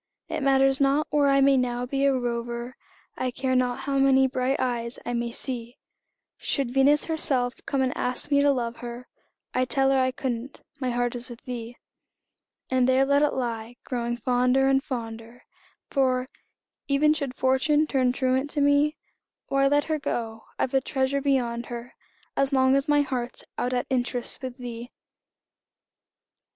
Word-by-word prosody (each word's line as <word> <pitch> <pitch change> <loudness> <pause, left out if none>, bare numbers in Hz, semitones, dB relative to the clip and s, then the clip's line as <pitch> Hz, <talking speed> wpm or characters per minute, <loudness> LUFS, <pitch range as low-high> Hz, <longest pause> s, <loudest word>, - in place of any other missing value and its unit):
It - - -3
matters 270 0 +3
not 280 +2 +3
where 290 -1 +3
I 275 0 +4
may 275 0 +5
now 245 -1 -1
be 275 +2 0
a 275 - +3
rover, 235 0 -4 0.4
I 255 - -1
care 260 +1 -1
not 250 -1 +1
how 275 0 -1
many 270 -1 +5
bright 260 +1 0
eyes 240 -1 -2
I 245 - -2
may 235 0 -2
see; 240 -1 -5 0.6
Should 275 -4 -1
Venus 275 +3 +4
herself 265 -6 +1
come 270 -1 +1
and 255 - -1
ask 250 +4 -2
me 280 0 +5
to 285 - +4
love 240 -4 -1
her, 240 +1 -8 0.5
I'd 255 0 0
tell 270 0 +2
her 270 - +3
I 255 0 +2
couldn't 255 0 -5 0.2
my 255 -2 -1
heart 245 0 0
is 245 +1 -5
with 235 -1 -10
thee. 240 -1 -7 0.9
And 255 -1 +2
there 260 +1 +4
let 280 +1 +3
it 295 - +2
lie, 235 -2 -3
growing 240 -1 -2
fonder 250 +2 +2
and, 270 0 +3
fonder 230 -1 -6 0.5
For, 255 -2 +1 0.6
even 295 +2 +4
should 280 -4 -4
Fortune 295 +4 +2
turn 260 -4 +1
truant 260 +2 0
to 295 - 0
me, 285 +2 +3 0.5
Why, 275 0 +3
let 290 +1 +3
her 310 0 -2
go 225 -5 -4
I've 255 - -1
a 270 - +3
treasure 270 0 -1
beyond 245 -4 0
her, 240 +1 -7 0.4
As 275 0 +1
long 260 0 +4
as 275 0 +1
my 290 -1 +4
heart's 250 -3 -3
out 250 - -1
at 250 -1 0
interest 245 -1 -1
With 255 -1 -6
thee! 240 -1 -7
260 Hz, 170 wpm, -26 LUFS, 245-275 Hz, 0.9 s, may